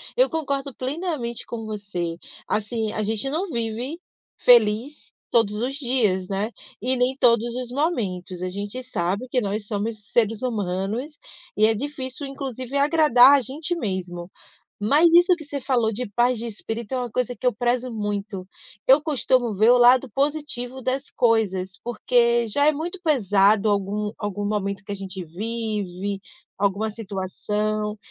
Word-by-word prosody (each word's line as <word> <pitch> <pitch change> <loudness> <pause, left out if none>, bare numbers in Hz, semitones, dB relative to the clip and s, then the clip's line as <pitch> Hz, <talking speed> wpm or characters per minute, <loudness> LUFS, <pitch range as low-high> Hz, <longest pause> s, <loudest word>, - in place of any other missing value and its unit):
Eu - - +4
concordo 280 -4 -2
plenamente 265 -4 -3
com 225 -2 -6
você. 200 -6 -4 0.3
Assim 220 +1 -1
a 215 - -2
gente 220 +4 -1
não 355 +5 -2
vive 235 +6 -3 0.4
feliz 235 +4 +3 0.2
todos 220 -3 +3
os 265 +2 -1
dias, 235 -9 +1
né? 205 +4 -2 0.3
E 255 +3 0
nem 255 +2 +1
todos 235 -3 +4
os 250 -1 -4
momentos. 190 - -2
A 185 - -1
gente 205 +6 -5
sabe 200 +1 -2
que 250 0 +1
nós 205 0 -2
somos 210 +1 -3
seres 225 0 +1
humanos 215 - -2 0.4
e 215 - +5
é 225 - +4
difícil, 270 +2 -4
inclusive 270 -1 -5
agradar 280 -4 +6
a - - -3
gente 295 +8 -3
mesmo. 185 - -4 0.5
Mas 290 +11 +4
isso 355 +1 +7
que 310 - -10
você 285 -1 -5
falou 240 -4 +1
de 250 +4 -3
paz 245 0 +3
de 235 - -4
espírito 225 +2 -6
é - - +1
uma 245 -2 -3
coisa 245 0 -1
que 250 - -4
eu 250 - +4
prezo 245 +2 0
muito. 205 -3 -4 0.4
Eu 270 +3 +8
costumo 255 -7 +1
ver 215 +5 +5
o 250 - +6
lado 250 +1 +5
positivo 270 -2 -2
das 265 +3 -2
coisas, 200 -5 +1
porque 235 0 +2
já 285 +7 +2
é 305 - +6
muito 340 +5 -4
pesado 210 - +3
algum 205 +1 0
algum 205 -1 -3
momento 200 -1 -2
que 205 - -10
a - - -1
gente 190 -1 -6
vive, 205 0 -4 0.4
alguma 205 +2 0
situação. 210 +1 -3
230 Hz, 160 wpm, -24 LUFS, 205-260 Hz, 0.5 s, Eu